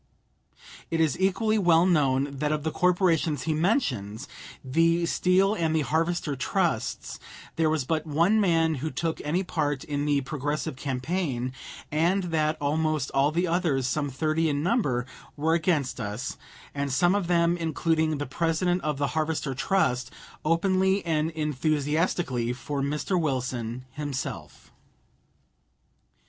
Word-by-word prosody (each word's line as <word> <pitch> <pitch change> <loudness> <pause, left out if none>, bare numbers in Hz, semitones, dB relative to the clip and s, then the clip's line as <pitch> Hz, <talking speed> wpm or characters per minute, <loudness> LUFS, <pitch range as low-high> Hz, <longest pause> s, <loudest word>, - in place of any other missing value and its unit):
It 165 - -1
is 160 -4 +2
equally 215 +3 +2
well 170 -2 +5
known 140 -5 +2
that 150 +1 0
of 150 -1 -1
the 160 - -1
corporations 170 -6 +2
he 160 - 0
mentions, 140 - 0 0.4
the 165 +5 +2
Steel 185 +4 +3
and 165 -5 0
the 160 - +2
Harvester 160 0 0
Trusts, 130 - -1 0.4
there 160 -1 +2
was 155 -4 0
but 160 +2 -1
one 170 +9 +3
man 165 -4 +3
who 155 - -1
took 165 +1 -3
any 170 +6 0
part 145 -6 -1
in 145 -1 -2
the 145 -1 +2
Progressive 145 0 -3
campaign, 130 -1 -2 0.4
and 170 +6 +2
that 155 0 +1
almost 155 -1 0
all 140 +2 +2
the 175 +3 +1
others, 165 -7 +1
some 145 +3 -1
thirty 155 +4 0
in 145 0 -1
number, 150 - +1 0.3
were 160 +2 +1
against 160 -6 0
us, 110 +4 -4 0.4
and 140 -1 -2
some 175 +7 +3
of 200 -4 0
them, 170 -1 +3
including 160 -1 0
the 145 - -3
President 170 +5 0
of 150 -2 -2
the 140 0 0
Harvester 155 -3 -1
Trust, 130 - 0 0.3
openly 190 +4 +2
and 160 -1 +1
enthusiastically 150 -3 0
for 140 +3 -4
Mr. 150 +6 0
Wilson 125 -4 -2
himself. 140 -1 -6
155 Hz, 140 wpm, -26 LUFS, 140-170 Hz, 0.4 s, well